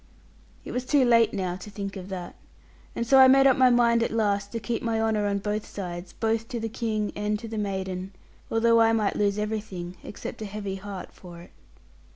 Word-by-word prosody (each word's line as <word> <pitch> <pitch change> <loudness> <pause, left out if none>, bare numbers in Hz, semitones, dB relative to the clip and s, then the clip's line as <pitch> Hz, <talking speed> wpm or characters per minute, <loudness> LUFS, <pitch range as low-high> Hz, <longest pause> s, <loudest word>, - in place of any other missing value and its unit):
It - - -6
was 250 - -2
too 270 0 +3
late 230 -2 +5
now 185 -2 -2
to 190 +3 -10
think 200 -1 -6
of 190 0 -8
that; 180 -2 -6 0.6
and 235 - -1
so 270 +3 +6
I 260 - +9
made 270 +1 +6
up 265 -2 +6
my 260 -1 +5
mind 235 -1 +4
at 230 - +1
last 205 -2 0
to 230 - -3
keep 230 +1 -3
my 225 -1 -1
honour 220 -2 +1
on 200 0 0
both 210 +1 -2
sides, 175 -2 -6
both 225 0 -1
to 235 - -4
the 225 0 -3
King 215 -2 -2
and 210 +1 -1
to 225 - -8
the 220 -1 -4
maiden, 190 -2 -3 0.4
although 230 0 +4
I 225 0 +4
might 215 -3 +1
lose 205 -1 +1
everything 205 -4 -4
except 205 - -8
a - - -3
heavy 200 -1 -5
heart 195 -1 -8
for 175 -2 -12
it. - - -17
210 Hz, 215 wpm, -26 LUFS, 195-230 Hz, 0.6 s, I